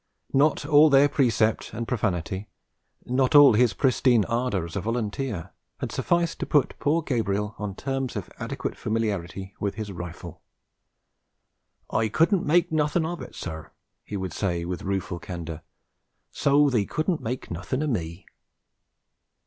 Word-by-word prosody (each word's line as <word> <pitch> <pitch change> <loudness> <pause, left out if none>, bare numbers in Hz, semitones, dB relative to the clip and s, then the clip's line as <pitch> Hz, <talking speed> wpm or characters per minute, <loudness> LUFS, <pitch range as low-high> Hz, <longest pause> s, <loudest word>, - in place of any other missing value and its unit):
Not 145 +2 +3
all 150 +1 +6
their 140 0 +6
precept 115 -8 +1
and 115 0 -4
profanity, 95 -4 -2 0.6
not 130 +3 +1
all 145 -4 +9
his 115 -2 +3
pristine 125 -4 +3
ardour 115 -6 -1
as 85 - -9
a 100 - -1
volunteer, 115 -2 -3 0.3
had - - -4
sufficed 170 -1 0
to - - -3
put 145 -4 +2
poor 160 +3 +1
Gabriel 105 -6 -1
on 105 -2 -4
terms 135 0 -3
of 100 - -4
adequate - - -4
familiarity 100 -4 -3
with 100 -1 -2
his 105 -2 -5
rifle. 85 -2 -8 1.5
'I 110 0 +1
couldn' 170 - +2
make 170 +2 +3
nothin' 155 +1 +1
of 170 +1 -4
it, - - -9
sir,' 80 -3 -6 0.3
he 105 - -5
would 95 -3 -4
say 85 -4 -1
with 90 -1 -4
rueful 95 -3 -3
candour. 85 -2 -6 0.7
'So 145 0 +3
they 110 -5 +2
couldn' 160 - -1
make 125 +3 -5
nothin' 95 - -2
o' - - -1
me.' 85 - -3
115 Hz, 150 wpm, -25 LUFS, 95-140 Hz, 1.5 s, all